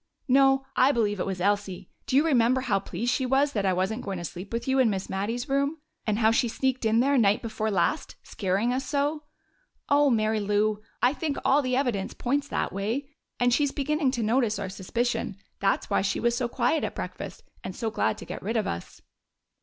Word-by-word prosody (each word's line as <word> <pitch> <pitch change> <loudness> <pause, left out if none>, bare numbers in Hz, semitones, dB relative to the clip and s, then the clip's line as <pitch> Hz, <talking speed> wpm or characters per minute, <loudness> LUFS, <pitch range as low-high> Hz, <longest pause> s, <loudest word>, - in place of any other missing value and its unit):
"No, 270 0 +4
I 260 +2 +5
believe 210 -6 0
it - - -1
was 190 -2 -3
Elsie. 195 -1 -1 0.2
Do - - 0
you 290 +4 +5
remember 255 -3 +3
how 210 -6 +1
pleased 235 +5 -2
she 260 -1 0
was 275 +3 +3
that 200 -3 0
I 190 - +3
wasn't 190 +6 -1
going 195 -2 -4
to 175 - -6
sleep 180 +4 -8
with 230 +2 -3
you 265 0 +2
in 250 -3 +5
Miss 195 -2 -3
Mattie's 225 +7 -2
room? 280 +3 0 0.3
And 210 -1 +1
how 220 -1 +4
she 235 +1 +2
sneaked 260 +1 -1
in 220 +1 +4
there 275 +1 +3
night 205 0 +3
before 220 -1 -2
last, 210 - 0
scaring 200 +5 -1
us 260 +1 -1
so? 295 +2 -1 0.6
Oh, 285 0 +5
Mary 220 -2 +1
Lou, 210 +1 +1 0.2
I 250 +2 +5
think 300 -1 -3
all 280 +2 +4
the 255 -2 -1
evidence 245 -8 -1
points 280 +3 -1
that - - -2
way. 230 +9 -3 0.3
And 245 0 +3
she's 285 +1 +2
beginning 295 0 0
to 240 -3 -1
notice 225 -1 +1
our 200 -2 -4
suspicion. 225 +2 -2 0.2
That's 195 0 +1
why - - +1
she 195 0 -1
was 235 0 +1
so 245 -1 0
quiet 245 +6 0
at - - -3
breakfast - - -6 0.2
and 185 - -6
so 225 -1 -2
glad 110 - 0
to - - -9
get - - -7
rid 225 +4 -1
of 215 - 0
us." 85 - -6
235 Hz, 215 wpm, -27 LUFS, 205-270 Hz, 0.6 s, I